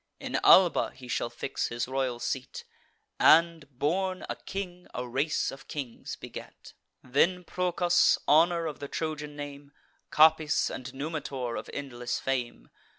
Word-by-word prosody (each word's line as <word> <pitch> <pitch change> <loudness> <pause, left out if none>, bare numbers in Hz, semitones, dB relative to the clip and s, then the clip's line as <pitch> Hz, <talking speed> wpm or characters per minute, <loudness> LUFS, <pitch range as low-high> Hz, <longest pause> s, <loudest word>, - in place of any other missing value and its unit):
In - - -2
Alba 180 -3 +6
he 130 -1 -12
shall 120 - -1
fix 120 +3 -3
his 120 +1 -3
royal 130 -2 -1
seat, 130 +1 -4 0.6
And, 165 -2 +5
born 185 +6 -1
a - - -3
king, 180 -2 -7
a 125 0 -3
race 135 +6 0
of 135 +1 -12
kings 135 -6 -6
beget. - - -11 0.3
Then 170 +8 +2
Procas, 180 0 +2
honour 170 +2 +4
of 155 -3 -5
the 140 - -5
Trojan 150 -1 -4
name, 145 -1 -8 0.4
Capys, 155 -1 +4
and 130 0 -6
Numitor, 135 -4 -4
of - - -6
endless 125 -4 -4
fame. 120 - -3
145 Hz, 140 wpm, -28 LUFS, 130-165 Hz, 0.6 s, Alba